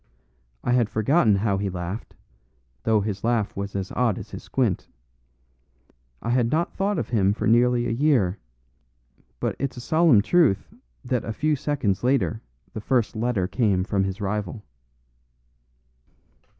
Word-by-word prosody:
I -, -, 0 dB
had 120 Hz, -3 st, +3 dB
forgotten 110 Hz, +1 st, +3 dB
how 100 Hz, -1 st, 0 dB
he 100 Hz, -1 st, -1 dB
laughed, 90 Hz, +4 st, -6 dB, 0.7 s
though 110 Hz, -2 st, +3 dB
his 100 Hz, -1 st, -4 dB
laugh 115 Hz, -3 st, 0 dB
was 100 Hz, 0 st, -5 dB
as 95 Hz, -1 st, -3 dB
odd 120 Hz, -5 st, +1 dB
as -, -, -9 dB
his -, -, -7 dB
squint. -, -, -1 dB, 1.4 s
I 115 Hz, -, -1 dB
had 120 Hz, -2 st, +2 dB
not 160 Hz, +6 st, 0 dB
thought 200 Hz, 0 st, -1 dB
of -, -, -3 dB
him 100 Hz, -4 st, +2 dB
for -, -, -4 dB
nearly 120 Hz, +1 st, +3 dB
a 115 Hz, -, -1 dB
year. 115 Hz, -7 st, +2 dB, 1.0 s
But -, -, -1 dB
it's 140 Hz, -2 st, -3 dB
a -, -, -5 dB
solemn 155 Hz, -5 st, +4 dB
truth 165 Hz, -, +2 dB, 0.3 s
that 125 Hz, -1 st, -1 dB
a 115 Hz, -, -4 dB
few 150 Hz, +7 st, +1 dB
seconds 130 Hz, -9 st, -1 dB
later 115 Hz, -5 st, +1 dB, 0.3 s
the 110 Hz, -, -5 dB
first 120 Hz, -1 st, 0 dB
letter 110 Hz, -5 st, 0 dB
came 100 Hz, -5 st, +1 dB
from 100 Hz, -1 st, 0 dB
his 95 Hz, +1 st, -3 dB
rival." 105 Hz, +1 st, -3 dB
115 Hz, 150 wpm, -24 LUFS, 100-125 Hz, 1.4 s, solemn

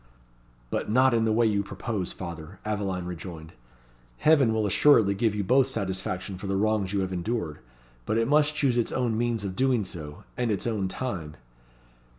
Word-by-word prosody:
"But -, -, -2 dB
not 130 Hz, +3 st, +4 dB
in 115 Hz, -1 st, +2 dB
the 110 Hz, -, +2 dB
way 115 Hz, +2 st, +3 dB
you 105 Hz, -2 st, +2 dB
propose, 100 Hz, 0 st, -4 dB
father," 85 Hz, 0 st, -8 dB
Aveline 100 Hz, -4 st, -2 dB
rejoined. 85 Hz, -2 st, -8 dB, 0.6 s
"Heaven 145 Hz, -7 st, +4 dB
will 110 Hz, -1 st, +1 dB
assuredly 105 Hz, 0 st, +5 dB
give 105 Hz, +1 st, 0 dB
you 105 Hz, -, -1 dB
both 130 Hz, +6 st, +4 dB
satisfaction 95 Hz, -4 st, -3 dB
for 100 Hz, -, -6 dB
the 95 Hz, -, 0 dB
wrongs 105 Hz, -2 st, +1 dB
you 100 Hz, -1 st, 0 dB
have 95 Hz, -1 st, -2 dB
endured; 90 Hz, -4 st, -3 dB, 0.5 s
but 110 Hz, -, +1 dB
it 115 Hz, 0 st, +2 dB
must 150 Hz, +1 st, +3 dB
choose 130 Hz, -5 st, +2 dB
its 115 Hz, -, 0 dB
own 120 Hz, -4 st, 0 dB
means 115 Hz, -2 st, -1 dB
of 95 Hz, -1 st, -4 dB
doing 125 Hz, -3 st, +2 dB
so, 80 Hz, -5 st, -8 dB
and 125 Hz, -2 st, -1 dB
its 105 Hz, -3 st, -1 dB
own 105 Hz, -5 st, 0 dB
time." 90 Hz, -9 st, -4 dB
105 Hz, 180 wpm, -27 LUFS, 95-120 Hz, 0.6 s, assuredly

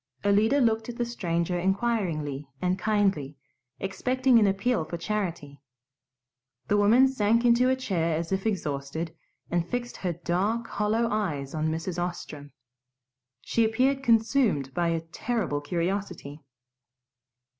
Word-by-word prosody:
Alida 210 Hz, +7 st, +4 dB
looked 225 Hz, -2 st, +1 dB
at 235 Hz, -, -6 dB
the 240 Hz, -, 0 dB
stranger 175 Hz, -6 st, -1 dB
inquiringly 175 Hz, -, -1 dB
and 180 Hz, +3 st, 0 dB
kindly, 195 Hz, -9 st, 0 dB, 0.4 s
expecting 250 Hz, +6 st, +2 dB
an 210 Hz, -, +4 dB
appeal 195 Hz, 0 st, +1 dB
for 170 Hz, +2 st, -5 dB
charity. 170 Hz, -8 st, -4 dB, 1.1 s
The 205 Hz, -, +3 dB
woman 225 Hz, +6 st, +6 dB
sank 230 Hz, -2 st, +2 dB
into 240 Hz, +2 st, +5 dB
a 260 Hz, -, +3 dB
chair 170 Hz, -10 st, -1 dB
as 165 Hz, +2 st, -4 dB
if 190 Hz, +2 st, 0 dB
exhausted, 160 Hz, -3 st, -3 dB, 0.4 s
and 175 Hz, 0 st, 0 dB
fixed 245 Hz, 0 st, -3 dB
her 180 Hz, -2 st, -2 dB
dark 185 Hz, +8 st, -1 dB
hollow 220 Hz, +2 st, 0 dB
eyes 155 Hz, -11 st, -2 dB
on 155 Hz, 0 st, 0 dB
Mrs. 165 Hz, +2 st, -3 dB
Ostrom. 150 Hz, -5 st, -6 dB, 0.9 s
She 230 Hz, -, +1 dB
appeared 260 Hz, +5 st, +2 dB
consumed 225 Hz, -, +2 dB
by 175 Hz, -1 st, +1 dB
a 165 Hz, -1 st, 0 dB
terrible 165 Hz, -1 st, -2 dB
curiosity. 170 Hz, -2 st, -3 dB
195 Hz, 130 wpm, -27 LUFS, 165-230 Hz, 1.1 s, woman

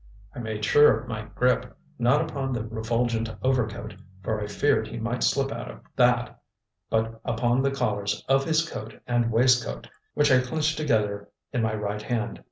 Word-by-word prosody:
I -, -, -8 dB
made 110 Hz, -2 st, -3 dB
sure 145 Hz, +6 st, +6 dB
of 125 Hz, -, -11 dB
my 110 Hz, -3 st, -5 dB
grip, 125 Hz, +2 st, +1 dB, 0.2 s
not 125 Hz, +5 st, +4 dB
upon 135 Hz, -2 st, -3 dB
the 115 Hz, -3 st, -2 dB
refulgent 115 Hz, +1 st, -1 dB
overcoat, 110 Hz, -4 st, 0 dB, 0.3 s
for 110 Hz, +2 st, -1 dB
I 105 Hz, -, -3 dB
feared 110 Hz, +2 st, +1 dB
he 115 Hz, -, -7 dB
might 115 Hz, +2 st, -3 dB
slip 135 Hz, 0 st, +1 dB
out -, -, -5 dB
of -, -, -10 dB
that, 125 Hz, -1 st, +2 dB, 0.5 s
but 115 Hz, 0 st, -1 dB
upon 120 Hz, +2 st, +1 dB
the 135 Hz, -, +2 dB
collars 105 Hz, -7 st, -2 dB
of 135 Hz, 0 st, +3 dB
his 160 Hz, +2 st, +1 dB
coat 110 Hz, -6 st, -8 dB
and 120 Hz, -1 st, +1 dB
waistcoat, 120 Hz, -, +2 dB, 0.3 s
which 150 Hz, -1 st, +3 dB
I 130 Hz, -, +7 dB
clenched 155 Hz, +4 st, -1 dB
together 105 Hz, -8 st, 0 dB, 0.2 s
in 125 Hz, -, +1 dB
my 110 Hz, -1 st, 0 dB
right 105 Hz, 0 st, -3 dB
hand. 120 Hz, 0 st, -3 dB
120 Hz, 175 wpm, -26 LUFS, 110-130 Hz, 0.5 s, I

